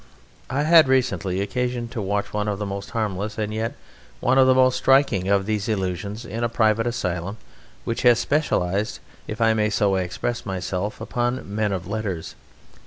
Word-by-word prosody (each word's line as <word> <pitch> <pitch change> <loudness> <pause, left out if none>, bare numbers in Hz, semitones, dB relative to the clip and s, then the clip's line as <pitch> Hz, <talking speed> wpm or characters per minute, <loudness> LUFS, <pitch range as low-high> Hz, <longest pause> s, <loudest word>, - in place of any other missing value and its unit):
I 135 +3 0
had 160 -1 +7
recently 125 -8 +1
occasion 125 +3 -2
to 115 - -4
watch 100 +1 -2
one 105 0 -1
of 105 -1 -1
the 105 - -3
most 100 0 -5
harmless 105 -2 -3
and 105 -1 -2
yet 115 +5 -2 0.4
one 130 +1 +3
of 130 - +6
the 130 - +5
most 130 -1 +4
striking 130 -8 +3
of 100 -1 +3
these 105 0 -1
illusions 100 +2 -3
in 115 +2 -4
a 120 - +1
private 115 0 +2
asylum 95 -3 -3 0.5
which 115 - -2
has 120 -2 +6
specialized, 105 - 0 0.3
if 110 - -5
I 115 -1 +4
may 105 -1 +1
so 100 -1 +2
express 95 +6 -3
myself, 95 0 -3
upon 120 -1 -2
men 105 -1 0
of 95 -2 -3
letters. 100 -4 -4
110 Hz, 175 wpm, -23 LUFS, 100-120 Hz, 0.5 s, had